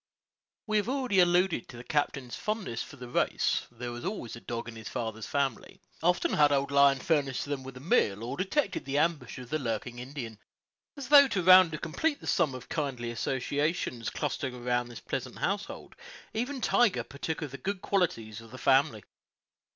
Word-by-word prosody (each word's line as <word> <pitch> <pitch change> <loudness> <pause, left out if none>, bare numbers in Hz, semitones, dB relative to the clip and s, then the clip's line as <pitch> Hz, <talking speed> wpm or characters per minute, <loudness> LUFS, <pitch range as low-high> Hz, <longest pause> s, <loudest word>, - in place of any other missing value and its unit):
We 215 -1 +1
have 210 +2 0
already 255 -7 +1
alluded 175 -4 +3
to 120 - -10
the 120 - -8
captain's 140 -3 -1
fondness 215 - -3
for - - -8
the 125 -2 -9
race: 120 - 0
there 120 0 -6
was 120 0 -7
always 180 - -4
a 115 - -11
dog 120 0 -5
in 120 - -8
his 110 -1 -7
father's 110 -1 -4
family. 140 -2 -2 0.2
Often 175 +2 +2
had 145 -1 +5
old 140 0 +1
Lion 140 -1 +6
furnished 140 -2 0
them 145 -2 -3
with 130 -1 -9
a - - -10
meal, 115 - +2
or 120 - -4
detected 195 - -1
the 140 +1 -1
ambush 160 -1 0
of 125 -1 -10
the 155 - 0
lurking 120 -1 -3
Indian. 125 -4 -7 0.6
As 270 -3 -7
though 285 -1 +9
to 195 -8 -1
round 185 -2 +8
and 155 - -6
complete 285 - 0
the - - -12
sum 155 -8 +1
of 130 - -9
kindly 130 -6 -3
associations 135 +1 -1
clustering 140 -3 -3
around 120 0 -1
this 120 -1 -10
pleasant 130 -1 -4
household, 200 +1 -3 0.4
even 250 +4 -2
Tiger 240 -5 +3
partook 155 +3 -4
of 145 - -5
the 140 - -8
good 200 0 -3
qualities 115 - -1
of 115 - -14
the 130 - -10
family. 130 -6 +3
140 Hz, 190 wpm, -29 LUFS, 120-180 Hz, 0.6 s, though